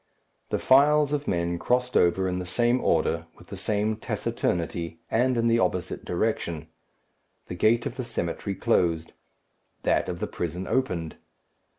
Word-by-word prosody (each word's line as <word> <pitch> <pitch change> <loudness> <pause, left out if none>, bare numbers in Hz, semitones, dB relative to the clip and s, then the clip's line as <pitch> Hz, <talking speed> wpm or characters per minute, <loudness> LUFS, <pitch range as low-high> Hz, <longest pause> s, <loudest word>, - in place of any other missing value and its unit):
The - - 0
files 145 +2 +4
of 145 0 -2
men 85 -1 0
crossed 125 +4 0
over 95 +2 +3
in 90 0 -1
the 90 - -4
same 120 +6 +2
order, 80 +1 +1
with 90 - -17
the - - -6
same 105 +2 -1
taciturnity, 85 -5 -2
and 125 +2 +2
in 115 - +1
the 115 0 +3
opposite 90 -2 -1
direction. 85 -5 -2 0.8
The - - -4
gate 110 +6 +2
of 130 -3 -4
the 130 - -2
cemetery 100 -3 -3
closed. 85 -3 +1 0.7
That - - +1
of 90 -1 -4
the - - -1
prison 90 +2 -4
opened. 90 -12 -1
95 Hz, 155 wpm, -26 LUFS, 85-120 Hz, 0.8 s, files